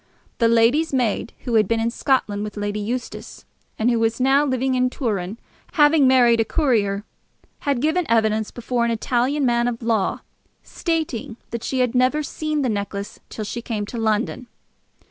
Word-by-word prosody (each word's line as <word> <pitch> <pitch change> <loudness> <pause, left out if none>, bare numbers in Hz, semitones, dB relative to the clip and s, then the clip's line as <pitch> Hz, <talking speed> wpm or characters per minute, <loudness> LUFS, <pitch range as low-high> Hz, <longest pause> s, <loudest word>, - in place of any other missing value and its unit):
The 230 - +4
lady's 230 +8 +3
maid 245 -4 0
who 245 - -3
had 215 -3 +4
been 230 +1 +1
in 230 +1 0
Scotland 220 -6 0
with 210 0 -6
Lady 205 0 -2
Eustace, 240 +4 -5 0.3
and 230 +3 +2
who 235 - +1
was 225 +1 0
now 270 +3 +4
living 260 -2 0
in 255 0 +2
Turin, 210 -6 -3 0.4
having 295 -2 +5
married 245 -3 +5
a - - +4
courier, 215 -7 +1 0.7
had 270 -4 +1
given 315 +4 +1
evidence 220 -1 +2
before 240 0 -2
an 235 - +1
Italian 250 +5 0
man 240 -1 +2
of 235 -1 -3
law, 225 -4 0 0.4
stating 310 -10 -3
that 235 -1 -4
she 260 -1 -1
had 250 -2 +1
never 255 +4 +2
seen 305 0 -2
the - - +1
necklace 200 -1 -4
till 215 - -5
she 235 +3 -5
came 215 -3 -3
to 235 +3 -6
London. 225 +3 -1
235 Hz, 175 wpm, -22 LUFS, 220-260 Hz, 0.7 s, having